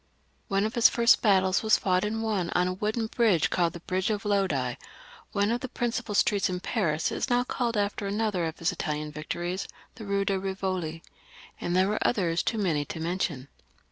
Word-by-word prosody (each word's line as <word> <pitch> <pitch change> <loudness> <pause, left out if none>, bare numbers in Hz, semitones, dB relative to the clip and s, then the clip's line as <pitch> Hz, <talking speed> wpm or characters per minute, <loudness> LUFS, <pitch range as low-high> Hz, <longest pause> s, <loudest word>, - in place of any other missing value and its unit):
One 195 -1 +1
of 220 - -2
his 235 - +6
first 235 -1 +4
battles 190 -4 +3
was 220 -1 +4
fought 185 -1 +1
and 220 +2 -2
won 200 -6 -1
on 180 0 +3
a 185 - -1
wooden 215 +4 -1
bridge, 220 -7 +2
called 170 -2 +1
the 170 - -9
Bridge 185 +2 -1
of 210 -1 -2
Lodi; 180 -12 +1 0.6
one 205 +1 +1
of 240 +1 -1
the 260 - -5
prin 240 0 -1
cipal 235 -3 -3
streets 200 -1 +3
in 180 0 -2
Paris 170 -7 0
is - - -2
now 245 0 +3
called 240 -2 -2
after 205 0 -1
another 205 -4 0
of 160 -1 -4
his 165 - 0
Italian 150 0 -3
victories, 175 +5 -4 0.3
the 225 - -10
Kue 200 -1 0
de 195 -1 0
Eivoli; 185 -4 -3 0.6
and 175 - -2
there 185 +1 +4
were 210 - 0
others 175 -7 +1
too 225 - -1
many 170 -8 +1
to 160 - -6
mention. 165 -5 -2
195 Hz, 205 wpm, -27 LUFS, 175-215 Hz, 0.6 s, his